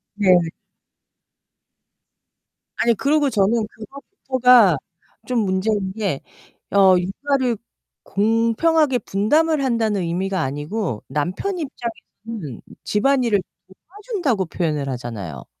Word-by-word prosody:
네. 190 -3 +5 2.4
아니 235 0 +3
그러고 285 +4 +2
저는 215 0 +2
그거부터가 250 - +2 0.5
좀 250 -2 0
문제인 195 0 0
게 200 -10 -2 0.5
어 190 -2 +6
육아를 255 +6 -1 0.5
공평하게 230 +8 +2
분담을 300 +10 +1
한다는 225 -6 +1
의미가 185 +2 -1
아니고 145 - -3
남편 180 - -2
입장에서는 225 - -7 0.2
집안일을 235 -2 +2 0.5
도와준다고 360 - -2
표현을 150 -5 -2
하잖아요. 105 - -6
215 Hz, 235 characters per minute, -21 LUFS, 185-260 Hz, 2.4 s, 어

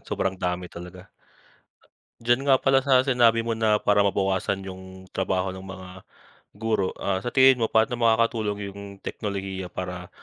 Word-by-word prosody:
sobrang 95 - -2
dami 90 0 -3
talaga. 90 +2 -11 1.1
Diyan 120 +4 +2
nga 135 - +7
pala 135 0 +3
sa 130 -2 +3
sinabi 120 -4 +3
mo 115 - -1
na 110 -1 +2
para 105 -1 +2
mabawasan 95 0 0
yung 95 0 -10
trabaho 95 0 -1
ng 95 - -8
mga 95 -1 -9 0.7
guro, 110 -3 0
ah, 95 -1 -1
sa 110 - -4
tingin 130 0 +5
mo 115 - +1
paano 110 +2 +2
makakatulong 110 -3 +1
yung 100 - -10 0.2
teknolohiya 95 -3 -4
para 90 0 -6
100 Hz, 155 wpm, -25 LUFS, 95-115 Hz, 1.1 s, nga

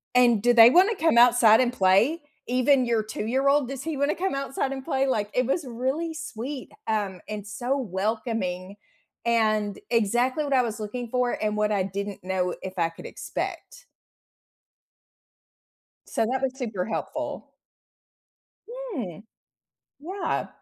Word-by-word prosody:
And 240 -4 +5
do 245 0 +5
they 230 -1 +9
wanna 380 - +5
come 325 -9 +2
outside 235 -2 +7
and 250 -1 +1
play? 210 - +3 0.3
Even 255 +1 +3
your 230 -2 +1
two-year-old, 265 +6 +1
does 270 -1 -5
he 315 -2 -3
wanna 285 +2 +1
come 375 -4 -1
outside 275 0 -2
and 265 -1 -6
play?" 270 -2 0
Like, 210 -6 0
it 250 - +2
was 280 +5 -1
really 265 +7 -2
sweet, 265 -2 -6 0.2
um, 205 -4 -1
and 210 -1 -5
so 250 +6 -2
welcoming 200 -4 -3 0.5
and 215 -3 +1
exactly 240 +5 +1
what 285 - -4
I 260 - +5
was 225 -2 -4
looking 235 +3 -5
for, 250 0 +1
and 210 0 0
what 210 0 +1
I 200 -2 +1
didn't 200 +1 -5
know 185 -1 -1
if 190 0 -7
I 165 -1 +2
could 165 - -13
expect. - - -6 2.2
So, - - 0
that 255 +4 -1
was 265 -1 -1
super 220 -8 -3
helpful. - - -4 1.2
Hmm. 445 - -6 0.8
Yeah. 375 +6 -3
240 Hz, 145 wpm, -25 LUFS, 210-270 Hz, 2.2 s, they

